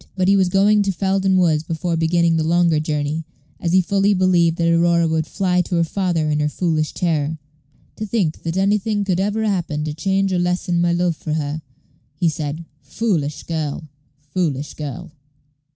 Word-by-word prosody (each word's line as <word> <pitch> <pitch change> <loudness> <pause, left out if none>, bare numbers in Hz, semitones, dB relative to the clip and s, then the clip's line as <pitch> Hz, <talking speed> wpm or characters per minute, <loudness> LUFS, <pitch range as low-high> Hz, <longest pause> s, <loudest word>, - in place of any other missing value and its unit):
But 185 -1 +1
he 200 - +5
was 190 -2 +3
going 205 +3 +4
to 200 -1 +1
Felden 190 +1 +1
Woods 165 -4 +3
before 165 +1 -2
beginning 165 +1 +2
the 160 - +1
longer 170 -1 +2
journey, 150 +1 -2 0.4
as 170 - -1
he 185 +1 +4
fully 200 +3 +2
believed 175 -3 +3
that 170 - +1
Aurora 170 0 +3
would 160 0 -1
fly 180 -1 +1
to 180 - -3
her 170 - +3
father 170 -2 -1
in 150 - 0
her 150 0 +1
foolish 155 -2 -1
terror. 160 -3 0 0.6
"To 215 - -4
think 195 -8 -1
that 165 +2 -3
anything 205 +1 +1
could 185 -2 0
ever 210 +3 0
happen 175 -7 -1
to 155 -1 -3
change 195 +4 0
or 180 - +1
lessen 175 -1 0
my 175 0 +2
love 175 -1 +1
for 155 - -4
her," 155 0 -2 0.5
he 165 +2 +1
said: 155 +1 -4 0.2
"foolish 150 -1 -2
girl! 155 -1 -4 0.3
foolish 150 -2 -2
girl!" 155 +3 -7
170 Hz, 185 wpm, -20 LUFS, 155-190 Hz, 0.6 s, he